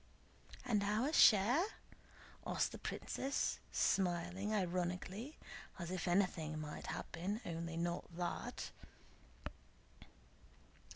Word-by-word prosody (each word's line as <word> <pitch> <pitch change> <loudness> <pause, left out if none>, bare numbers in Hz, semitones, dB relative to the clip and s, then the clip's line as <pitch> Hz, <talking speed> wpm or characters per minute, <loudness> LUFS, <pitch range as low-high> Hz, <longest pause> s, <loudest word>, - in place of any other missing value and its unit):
"And 220 -5 +2
our 220 +9 +1
share?" 235 - +7 0.8
asked - - +1
the - - -7
princess 275 +1 -1
smiling 180 +2 +1
ironically, 185 - -1 0.4
as 170 -2 -4
if 185 -2 -2
anything 175 -4 +1
might 150 -1 -6
happen, 190 +6 -3
only 170 0 -3
not 170 +1 -1
that. 180 +7 -3
185 Hz, 90 wpm, -38 LUFS, 170-210 Hz, 0.8 s, share